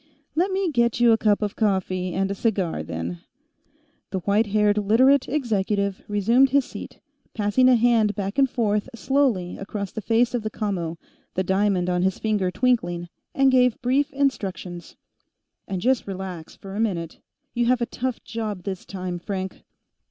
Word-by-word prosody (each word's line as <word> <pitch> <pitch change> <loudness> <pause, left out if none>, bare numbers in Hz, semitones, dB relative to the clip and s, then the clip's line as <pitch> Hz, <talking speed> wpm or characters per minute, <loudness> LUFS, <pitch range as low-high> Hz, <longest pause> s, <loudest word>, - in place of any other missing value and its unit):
"Let 350 +5 +1
me 380 -2 0
get 235 -3 +1
you 240 -1 +6
a 225 - +5
cup 210 -1 +2
of 205 - -2
coffee, 185 -3 0
and 195 +1 0
a - - 0
cigar, 195 - -1
then." 80 +2 -5 0.9
The 190 - -3
white 210 +4 +2
haired 210 0 +2
Literate 255 +7 +4
executive 205 -7 0
resumed 230 +6 +3
his 275 0 +3
seat, - - -9 0.4
passing 220 +4 +3
a 255 - +6
hand 230 -3 +3
back 200 +4 -3
and 270 -1 +4
forth 210 -1 0
slowly 235 -9 0
across 200 0 -5
the 220 - -5
face 230 +4 +2
of 245 - 0
the 215 - -3
commo, 180 -7 -3 0.4
the 185 - +1
diamond 190 -1 +1
on 180 -1 +1
his 190 0 +1
finger 210 -4 0
twinkling, 175 -6 0 0.3
and 270 -1 +4
gave 250 -2 +3
brief 270 +3 +2
instructions. 190 -10 -3 0.7
"And 190 - -3
just 255 +1 +1
relax, 185 -4 -6
for 195 0 -9
a - - -3
minute. 175 -7 -2 0.3
You 240 -1 +1
have 250 0 +3
a 235 - 0
tough 255 0 -4
job, 215 -5 -4
this 190 -1 -5
time, 185 -2 -4
Frank." 190 +1 -5
210 Hz, 170 wpm, -24 LUFS, 190-245 Hz, 0.9 s, you